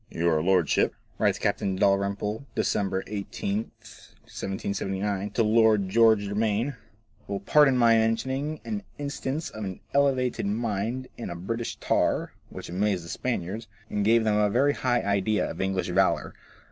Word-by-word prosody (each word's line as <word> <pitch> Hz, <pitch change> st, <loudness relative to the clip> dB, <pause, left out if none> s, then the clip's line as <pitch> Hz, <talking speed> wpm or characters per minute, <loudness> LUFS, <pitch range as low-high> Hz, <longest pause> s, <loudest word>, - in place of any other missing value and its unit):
"Your 80 Hz, -2 st, +1 dB
lordship," 90 Hz, -3 st, +2 dB, 0.2 s
writes -, -, +2 dB
Captain 95 Hz, -1 st, -1 dB
Dalrymple, 100 Hz, +5 st, 0 dB
December 95 Hz, -2 st, 0 dB
18, 100 Hz, -1 st, -3 dB, 0.7 s
1779, 100 Hz, +1 st, -3 dB
to 115 Hz, +3 st, +1 dB
Lord 110 Hz, -3 st, +4 dB
George 110 Hz, 0 st, +5 dB
Germaine, 105 Hz, +5 st, -1 dB, 0.2 s
" 105 Hz, -1 st, -35 dB
will 100 Hz, -1 st, -3 dB
pardon 135 Hz, +4 st, +5 dB
my 115 Hz, -2 st, +5 dB
mentioning 130 Hz, +7 st, 0 dB
an 210 Hz, -2 st, -3 dB, 0.2 s
instance 145 Hz, +1 st, -4 dB
of 110 Hz, -, -7 dB
an 95 Hz, -2 st, -5 dB
elevated 130 Hz, -6 st, +1 dB
mind 115 Hz, +3 st, -2 dB
in 115 Hz, -, -5 dB
a 85 Hz, -, -5 dB
British 115 Hz, +7 st, -4 dB
tar, -, -, 0 dB, 0.2 s
which -, -, -8 dB
amazed 95 Hz, -1 st, -1 dB
the -, -, -10 dB
Spaniards, 110 Hz, -3 st, -3 dB, 0.2 s
and 105 Hz, -, 0 dB
gave 115 Hz, +2 st, +4 dB
them 105 Hz, -1 st, +2 dB
a 105 Hz, -1 st, +3 dB
very 140 Hz, +7 st, +3 dB
high 120 Hz, -3 st, +1 dB
idea 100 Hz, +1 st, +1 dB
of -, -, -5 dB
English 95 Hz, -1 st, -1 dB
valour. 95 Hz, +2 st, +1 dB
105 Hz, 145 wpm, -26 LUFS, 100-120 Hz, 0.7 s, George